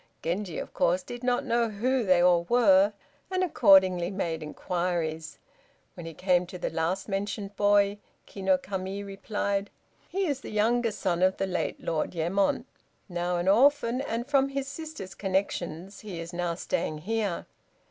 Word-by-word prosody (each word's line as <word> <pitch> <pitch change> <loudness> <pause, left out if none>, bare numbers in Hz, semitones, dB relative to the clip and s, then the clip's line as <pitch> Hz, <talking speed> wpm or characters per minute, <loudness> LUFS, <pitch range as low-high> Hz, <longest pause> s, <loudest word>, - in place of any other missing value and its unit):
Genji, 175 0 -2
of - - -6
course, 180 +2 +2
did 245 0 -8
not 250 +2 +1
know 235 -2 +1
who 245 +5 0
they 185 -3 +4
all 175 -1 +4
were, 205 -4 +5 0.4
and 370 -1 0
accordingly 190 - +5
made 170 -5 -3
inquiries. 165 0 -3 0.6
When 170 -2 -8
he 165 - -8
came 180 0 +2
to 180 - -8
the - - -3
last 175 +4 -1
mentioned 200 0 -3
boy, 205 0 +3 0.3
Ki 195 - -10
no 190 -1 +4
Kami 190 +1 -5
replied: 200 0 -2 0.4
"He 385 +2 -1
is 285 -5 -2
the - - -8
youngest 225 +1 +1
son 180 -3 0
of 185 +1 +3
the - - 0
late 185 -2 -2
Lord 165 +2 -2
Yemon, 190 +8 +1 0.4
now 175 -1 -1
an 175 +1 -2
orphan, 255 +3 +4
and, 235 -3 -3
from 275 -1 +2
his 275 0 -3
sister's 285 - -7
connections, 190 -2 -2
he 195 -6 -7
is 165 +1 -7
now 175 -1 -1
staying 175 - -2
here. 215 -4 -1
195 Hz, 165 wpm, -28 LUFS, 175-230 Hz, 0.6 s, were